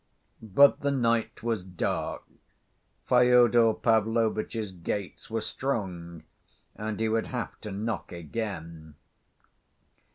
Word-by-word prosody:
But 115 Hz, +7 st, +5 dB
the 140 Hz, -, 0 dB
night 115 Hz, -6 st, 0 dB
was 115 Hz, -5 st, -1 dB
dark, 90 Hz, -1 st, -3 dB, 0.8 s
Fyodor 120 Hz, -2 st, +5 dB
Pavlovitch's 110 Hz, -1 st, +1 dB
gates 95 Hz, +2 st, -5 dB
were 115 Hz, 0 st, -2 dB
strong, 90 Hz, -, -4 dB, 0.5 s
and 110 Hz, -1 st, -4 dB
he 110 Hz, -, +1 dB
would 110 Hz, 0 st, 0 dB
have 125 Hz, -2 st, -5 dB
to 105 Hz, -, -6 dB
knock 105 Hz, +2 st, -3 dB
again. 85 Hz, -3 st, -6 dB
110 Hz, 100 wpm, -28 LUFS, 95-115 Hz, 0.8 s, But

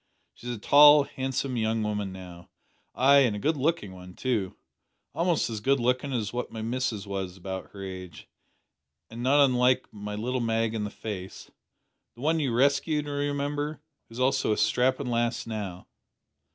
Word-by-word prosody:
She's 120 Hz, -, -9 dB
a -, -, -8 dB
tall, 145 Hz, +6 st, +7 dB
handsome 130 Hz, -1 st, -3 dB
young 110 Hz, 0 st, 0 dB
woman 105 Hz, -2 st, -2 dB
now; 90 Hz, -2 st, -11 dB, 0.5 s
ay, 140 Hz, +2 st, +6 dB
and 125 Hz, -6 st, +3 dB
a -, -, -4 dB
good 155 Hz, +8 st, +1 dB
looking 145 Hz, -, -1 dB
one 90 Hz, -1 st, -12 dB
too. 110 Hz, -8 st, -2 dB, 0.6 s
Almost 170 Hz, -1 st, +1 dB
as 110 Hz, -2 st, -4 dB
good 135 Hz, +5 st, +2 dB
lookin' 125 Hz, +3 st, 0 dB
as 115 Hz, -5 st, -2 dB
what 125 Hz, 0 st, -3 dB
my 110 Hz, -1 st, -6 dB
missus 115 Hz, -3 st, -2 dB
was 95 Hz, -2 st, -5 dB
about 95 Hz, 0 st, -6 dB
her 100 Hz, -1 st, -9 dB
age 95 Hz, -4 st, -8 dB, 0.8 s
an' 115 Hz, +1 st, -7 dB
not 140 Hz, +3 st, +5 dB
unlike 125 Hz, -1 st, +2 dB
my 105 Hz, 0 st, -6 dB
little 125 Hz, +4 st, -2 dB
Mag 115 Hz, -1 st, 0 dB
in 110 Hz, -2 st, -2 dB
the -, -, -4 dB
face 95 Hz, -3 st, -8 dB, 0.6 s
the 120 Hz, -, -13 dB
one 160 Hz, +3 st, +1 dB
you 140 Hz, -5 st, 0 dB
rescued, 140 Hz, +4 st, +2 dB
you 145 Hz, -, -5 dB
remember 145 Hz, +1 st, -2 dB, 0.3 s
who -, -, -14 dB
is 120 Hz, -, -8 dB
also 130 Hz, -2 st, +2 dB
a 105 Hz, -, +1 dB
strappin' 125 Hz, +5 st, +1 dB
lass 120 Hz, -1 st, -1 dB
now." 100 Hz, -5 st, -6 dB
120 Hz, 175 wpm, -27 LUFS, 105-140 Hz, 0.8 s, tall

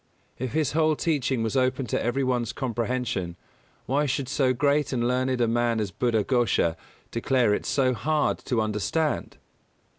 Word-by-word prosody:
If 130 Hz, -1 st, -3 dB
his 155 Hz, -3 st, +1 dB
whole 155 Hz, 0 st, +2 dB
teaching 140 Hz, -7 st, 0 dB
was 110 Hz, +3 st, -2 dB
open 130 Hz, 0 st, +1 dB
to 110 Hz, -, -1 dB
every 120 Hz, +3 st, 0 dB
one's 125 Hz, -3 st, 0 dB
comprehension 120 Hz, -7 st, -2 dB, 0.5 s
why 145 Hz, +3 st, +1 dB
should 140 Hz, 0 st, -1 dB
so 130 Hz, -1 st, +2 dB
great 145 Hz, +3 st, +1 dB
and 120 Hz, -2 st, 0 dB
learned 130 Hz, 0 st, 0 dB
a 120 Hz, -, +3 dB
man 115 Hz, 0 st, +1 dB
as 105 Hz, -3 st, -2 dB
Buddha 115 Hz, 0 st, +1 dB
Ghosha 115 Hz, -9 st, +1 dB, 0.4 s
declare 120 Hz, -2 st, +2 dB
it -, -, -2 dB
so 130 Hz, -2 st, +2 dB
hard 150 Hz, +5 st, 0 dB
to 120 Hz, -4 st, +1 dB
understand? 110 Hz, +9 st, -1 dB
125 Hz, 160 wpm, -26 LUFS, 115-140 Hz, 0.5 s, a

